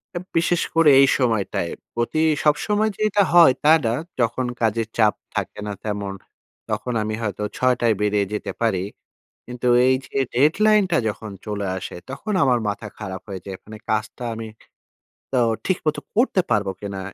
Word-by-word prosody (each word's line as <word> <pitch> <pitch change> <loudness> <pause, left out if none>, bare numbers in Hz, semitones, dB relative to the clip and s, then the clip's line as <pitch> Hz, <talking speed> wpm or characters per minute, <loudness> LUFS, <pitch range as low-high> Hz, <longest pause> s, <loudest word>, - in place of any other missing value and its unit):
আব 175 - -3
বিশেষ 170 +1 +2
করে 165 -2 +6
এই 135 - +6
সময়টায় 110 -8 0 0.2
প্রতি 120 +7 0 0.2
সবসময় 210 +9 +2
যে - - -10
এটা 205 0 +3
হয়, 170 -6 +8
তা 150 - +5 0.2
না। 115 - +1 0.3
যখন 120 +2 0 0.2
কাজের 115 0 +1
চাপ 110 -2 +4 0.2
থাকে - - -3
না 105 - -3
তেমন 100 -2 -3 0.6
তখন 125 - -2
আমি 110 0 -3
হয়তো 105 -2 -3
৬ 130 0 +3
টায় 115 -2 +4
বেরিয়ে 105 -1 +2
যেতে 105 - -3
পারি। 105 -6 +1 0.6
কিন্তু 125 0 -4 0.2
এই 130 - +4
যে, - - -17 0.2
deadline 205 - +4
টা 170 - +3
যখন 110 0 -7
চলে 105 -2 -3
আসে 95 - -7
তখন 140 +11 -4
আমার 125 -3 +3
মাথা 105 +1 -5
খারাপ 95 -3 -6
হয়ে 95 -2 -6
যায়। 95 -1 -6
মানে 110 0 -10
কাজটা 110 +2 -2
আমি 110 0 -6 0.8
তো 135 - 0 0.3
ঠিক 185 - +1
মতো 155 - +1 0.2
করতে 225 -4 +3
পারব 105 -3 +2
কিনা? 100 -1 -5
115 Hz, 170 wpm, -22 LUFS, 105-150 Hz, 0.8 s, হয়